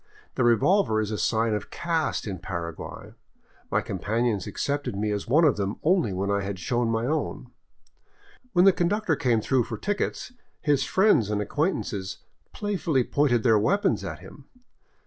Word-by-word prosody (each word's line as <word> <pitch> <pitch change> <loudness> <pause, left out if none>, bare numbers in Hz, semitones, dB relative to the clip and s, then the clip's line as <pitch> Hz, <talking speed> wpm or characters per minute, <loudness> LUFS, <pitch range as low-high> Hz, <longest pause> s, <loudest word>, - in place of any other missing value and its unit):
The - - 0
revolver 120 - +3
is 110 0 -2
a 105 - -2
sign 115 -1 +1
of 105 -1 -3
caste 165 -2 -1
in 95 -4 -5
Paraguay; 85 -2 -6 0.6
my - - +1
companions 105 +1 -1
accepted 145 -6 -2
me 105 +1 -1
as 100 -1 -3
one 155 +7 +4
of 140 -8 +3
them 100 0 -2
only 170 - +2
when 95 +2 -1
I 100 0 +1
had 100 0 -4
shown 120 +6 -1
my 115 +1 0
own. 155 +4 -3 1.0
When 180 0 +5
the 195 - +7
con 175 - +1
ductor 205 -5 0
came 120 -5 +1
through 125 0 +1
for - - -5
tickets, 205 +4 -3 0.3
his 145 -3 +2
friends 170 - +3
and 105 -1 0
acquaintances 105 - -2 0.3
play 205 -1 -3
fully 145 -8 +1
pointed 120 -4 +1
their 110 -3 +5
weapons 200 - +1
at - - -6
him. - - -13
120 Hz, 170 wpm, -26 LUFS, 105-160 Hz, 1.0 s, the